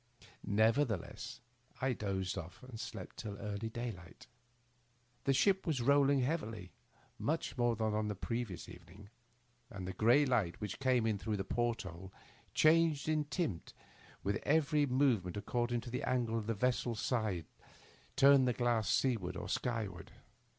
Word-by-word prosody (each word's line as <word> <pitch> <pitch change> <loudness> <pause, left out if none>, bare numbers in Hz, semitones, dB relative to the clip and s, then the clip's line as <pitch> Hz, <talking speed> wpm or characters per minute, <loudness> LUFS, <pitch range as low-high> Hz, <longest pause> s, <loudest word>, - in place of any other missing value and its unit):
Nev 110 +4 +3
ertheless 115 -11 -2 0.4
I 130 0 +1
dozed 95 -4 -2
off 90 +2 -8
and 125 -3 -9
slept 110 -6 -7
till 105 -2 -6
early 105 +2 -4
daylight. 110 -7 -7 1.0
The 135 - +4
ship 190 +7 +3
was 155 -5 +1
rolling 140 +2 +4
heavily, 115 - -2 0.5
much - - -1
more 120 -1 +2
than 110 -1 0
on 105 0 0
the 105 - -2
previous 115 -2 -4
evening, 100 +3 -13 0.6
and 95 -6 -6
the 95 - -4
gray 120 +9 +5
light 110 -10 +1
which 105 - -5
came 130 -4 +2
in 110 -3 0
through 105 0 -2
the 95 - -2
port 120 +4 -1
hole 90 +1 -9 0.4
changed 160 -2 +4
in 155 -1 +1
tint 145 - -3 0.5
with 100 +3 0
every 150 -1 +2
move 130 -5 +3
ment 90 +2 -6
according 120 +2 -1
as 120 - -8
the 125 - -2
angle 120 -3 0
of 110 -2 -2
the 115 - 0
vessel's 120 0 0
side 110 - -1 0.7
turned 140 -1 +6
the 125 - +2
glass 115 -4 +1
seaward 110 -6 +1
or - - -5
skyward. 110 -8 -3
115 Hz, 155 wpm, -35 LUFS, 100-130 Hz, 1.0 s, turned